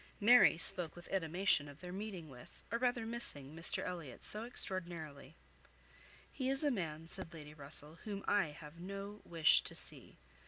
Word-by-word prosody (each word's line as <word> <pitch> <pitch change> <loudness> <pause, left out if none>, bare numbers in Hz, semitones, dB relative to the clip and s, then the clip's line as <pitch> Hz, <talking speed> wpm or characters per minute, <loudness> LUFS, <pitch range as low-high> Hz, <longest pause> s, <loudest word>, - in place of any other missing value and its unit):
Mary 235 -4 +7
spoke 175 -2 +4
with 175 - -11
animation 175 -4 +1
of 145 +1 -13
their 180 -1 -8
meeting 190 -4 -6
with, 125 -4 -15
or 230 - -1
rather 245 -2 0
missing, 155 - -4
Mr 165 +1 +3
Elliot 170 -8 -7
so 215 +2 +5
extraordinarily. 175 - -3 1.0
"He 260 -1 -2
is 270 +2 0
a 290 - +2
man," 165 -7 -4
said 180 -1 -5
Lady 150 -2 -10
Russell, 150 +2 -2
"whom 200 -2 -6
I 205 -5 +3
have 150 +2 -12
no 200 +3 -7
wish 165 -2 +5
to - - -3
see. - - -8
175 Hz, 165 wpm, -36 LUFS, 155-205 Hz, 1.0 s, Mary